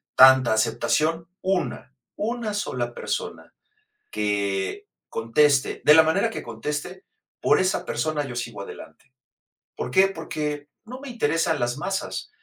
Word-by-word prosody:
tanta 130 -3 +7
aceptación?, 155 +9 +1
una 185 -7 -2 0.2
una 225 0 -2
sola 125 -12 -2
persona - - -5 0.6
que 100 -2 -1 0.2
conteste, 135 +5 +2
de 150 - +9
la 160 - +8
manera 190 +8 +2
que - - -6
conteste, 150 - -5 0.4
por - - +4
esa 185 0 +1
persona 155 -2 -1
yo 120 -3 -7
sigo 115 -4 -5
adelante, 130 +5 -11 0.6
¿por - - -4
qué?, 190 +6 +5
porque 150 -4 -4 0.2
no 255 +3 -8
me 280 - -8
interesan 165 -7 0
las 120 +1 -1
masas. 190 +6 -3
150 Hz, 130 wpm, -24 LUFS, 120-185 Hz, 0.6 s, de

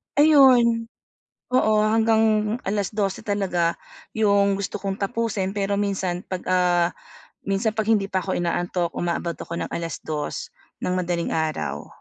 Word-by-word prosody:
Ayun. 255 -6 +5 0.7
Oo 215 -4 +3
hanggang 220 0 +2
12:00 200 -1 -1
talaga 185 -5 0 0.4
'yong 200 -2 +3
gusto 200 +1 -4
kong 195 -1 -3
tapusin 205 -2 -2
pero 200 0 -1
minsan 190 -3 -2
'pag, 185 -1 -4
ah, 180 -1 +3 0.6
minsan 200 +3 +1
'pag 215 0 -2
hindi 205 -3 +2
pa 190 - +1
ako 190 0 -3
inaantok 175 0 -1
umaabot 170 0 -2
ako 170 - -7
ng - - -4
2:00 160 -2 -4 0.3
ng 180 - 0
madaling-araw. 160 - -2
195 Hz, 125 wpm, -23 LUFS, 175-215 Hz, 0.7 s, Ayun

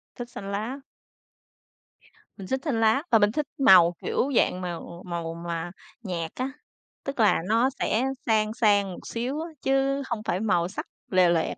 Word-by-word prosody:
Thích 240 -1 -7
xanh 200 -4 -7
lá. 220 +7 -3 1.6
Mình 195 -3 -8
thích 265 - 0
xanh 275 -8 0
lá 225 +6 +3
và 225 - +6
mình 205 0 +4
thích 295 +2 -2
màu, 185 -10 +7
kiểu, 270 - 0
dạng 185 -4 +2
mà, 180 -1 -3
ừm, 165 - -7 0.2
màu 170 -2 -4
mà 170 0 -4 0.3
nhạt 170 -5 -3
á, 260 +2 -2 0.5
tức 275 -2 -5
là 210 -6 +4
nó 230 +4 +3
sẽ 225 +4 +1 0.2
sang 215 -2 +2
sang 205 -4 +3
một - - -10
xíu 250 +6 -3
á, 330 - -5
chứ 270 +1 +1
hông 225 -3 -3
phải 185 - -1
màu 195 -5 +1
sắc 190 - -6 0.3
lòe 185 -2 +5
loẹt. 165 -2 0
215 Hz, 180 wpm, -26 LUFS, 180-255 Hz, 1.6 s, màu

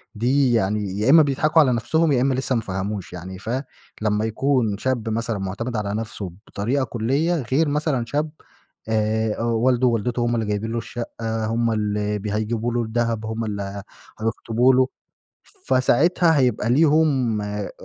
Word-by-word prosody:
دي 125 +3 +2
يعني 105 -2 0
يا 110 +5 +1
إما 160 +3 +8
بيضحَكوا 150 +3 +2
على 130 -4 +3
نفْسهم 155 +8 +1
يا 125 -3 +3
إما 135 +1 +2
لسه 130 0 -1
ما 115 - +1
فهموش 95 -1 -4
يعني، 90 +2 -7
ف 105 - -8 0.5
لما 105 0 +1
يكون 115 -2 0
شاب 120 -1 -1
مثلًا 115 0 -1
معتمِد 100 +6 -4
على 100 -1 -2
نفْسه 105 -4 -5 0.2
بطريقة 125 +7 -1
كُلّية 135 +9 0 0.2
غير 155 +4 +3
مثلًا 145 -4 0
شاب 150 +5 -1 0.6
آآ 110 0 0
والده، 120 +2 +2
والدته 120 +1 0
هُم 120 0 +1
اللي 115 - -1
جايبين 105 +2 -2
له 115 - -2
الشقة، 115 -1 -4
هُم 115 +1 0
اللي 105 -1 -1
ب 105 - -6
هيجيبوا 110 +3 -1
له 120 - +1
الدهب، 115 -1 -1
هُم 110 +1 -3
اللي 100 -1 -5 0.4
هيخطبوا 115 +3 +2
له، 130 0 +4 0.8
فساعتها 155 +6 +3
هيبقى 125 -4 +1
ليهم 140 -5 +3
آآ 105 0 -4
115 Hz, 160 wpm, -22 LUFS, 105-130 Hz, 0.8 s, إما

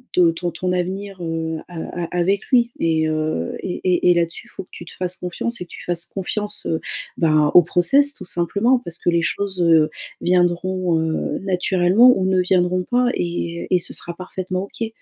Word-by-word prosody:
le 175 -2 +5
ton 175 +1 -3
ton 180 +2 -3
avenir, 190 +2 -3
heu, 165 -1 -3
a 170 -2 -7 0.2
a - - -3
avec 195 +3 0
lui 250 -2 +4 0.2
et 160 -1 +1
heu 155 - -2
et 180 - -5
et 180 -1 +3
et - - +6
là-dessus 170 -1 -2
faut - - -8
que - - -28
tu 175 - -10
te - - -12
fasses 185 0 -2
confiance 235 +7 -4
et - - -4
que - - -30
tu - - -10
fasses 170 -1 0
confiance, 210 +2 -4 0.5
ben, 155 -2 +3
au 175 - +9
process 270 - +5
tout 190 - -10
simplement. 200 +9 +2
Parce 170 -5 -3
que - - 0
les 170 -1 +1
choses 190 -1 -2 0.6
viendront, 175 -1 +1
heu, 160 0 -2
naturellement 190 +4 +4
ou 190 - -1
ne 190 0 +2
viendront 180 0 +1
pas 245 +5 +1
et 170 -1 -2 0.3
et - - -8
et - - +3
ce - - -5
sera 170 - -3
parfaitement 185 +1 -5
OK. 225 +3 -5
180 Hz, 195 wpm, -20 LUFS, 170-190 Hz, 0.6 s, au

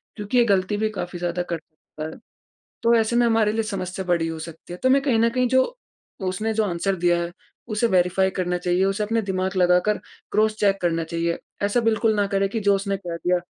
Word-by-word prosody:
क्योंकि 210 +3 -2
ये 240 - +7
गलती 200 -1 +1
भी 215 +1 0
काफ़ी 180 -3 -5
ज़्यादा 175 0 -1
करता 155 -1 -8
है 160 - -9 0.7
तो 235 +1 +4
ऐसे 225 +1 +1
में 240 0 +4
हमारे 225 -2 +3
लिए 225 +1 0
समस्या 190 -3 -4
बड़ी 170 -2 +1
हो 165 0 -5
सकती 165 +1 -9
है। - - -5
तो 260 - +3
मैं 275 +1 +4
कहीं 260 -5 +2
न 230 +1 +3
कहीं 250 +1 +1
जो 260 +1 +4 0.6
उसने 215 +5 -1
जो 220 0 +2
आंसर 190 +1 -1
दिया 175 0 +2
है 170 0 -5 0.4
उसे 215 +1 +1
वेरीफाई 180 +2 +2
करना 180 0 0
चाहिए 180 +1 +1
उसे 195 +2 0
अपने 225 +2 0
दिमाग 190 -1 -2
लगाकर 180 +3 +3 0.3
क्रॉस 215 0 +3
चेक 195 -1 +2
करना 165 -1 +1
चाहिए 170 +1 -2 0.2
ऐसा 205 +4 +2
बिल्कुल 225 -1 +2
ना 205 -1 +2
करें 195 0 +2
कि 225 +2 -3
जो 200 -1 +3
उसने 195 0 -2
कह 175 -3 -5
दिया 180 +1 +1
195 Hz, 220 wpm, -23 LUFS, 175-220 Hz, 0.7 s, ये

